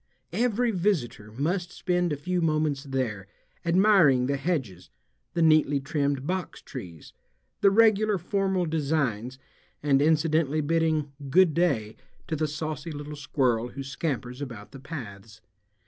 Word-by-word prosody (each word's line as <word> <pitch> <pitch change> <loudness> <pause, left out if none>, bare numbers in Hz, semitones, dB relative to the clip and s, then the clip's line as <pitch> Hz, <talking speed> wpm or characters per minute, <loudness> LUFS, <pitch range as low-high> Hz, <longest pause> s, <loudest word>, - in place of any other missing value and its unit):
Every 235 +3 +1
visitor 170 - -1
must 175 - -2
spend 180 -2 0
a - - 0
few 180 +5 -1
moments 155 -3 0
there, 120 -8 -3 0.4
admiring 170 -8 +4
the 140 +2 0
hedges, 135 - -3 0.5
the 170 - +2
neatly 155 -3 +4
trimmed 140 -1 -1
boxtrees, 130 - -6 0.5
the 200 - +5
regular 215 0 +4
formal 190 0 0
designs, 140 -7 -1 0.5
and 140 -2 +3
incidentally 155 -1 +2
bidding 155 -1 +1 0.2
"Good 180 +2 +5
day" 135 -11 0 0.3
to 160 - -2
the 155 0 0
saucy 155 +2 -4
little 150 0 -7
squirrel 130 -5 0
who 135 +2 -7
scampers 135 -2 -4
about 115 -7 -7
the 135 - -10
paths. 110 - -9
150 Hz, 130 wpm, -27 LUFS, 130-175 Hz, 0.5 s, the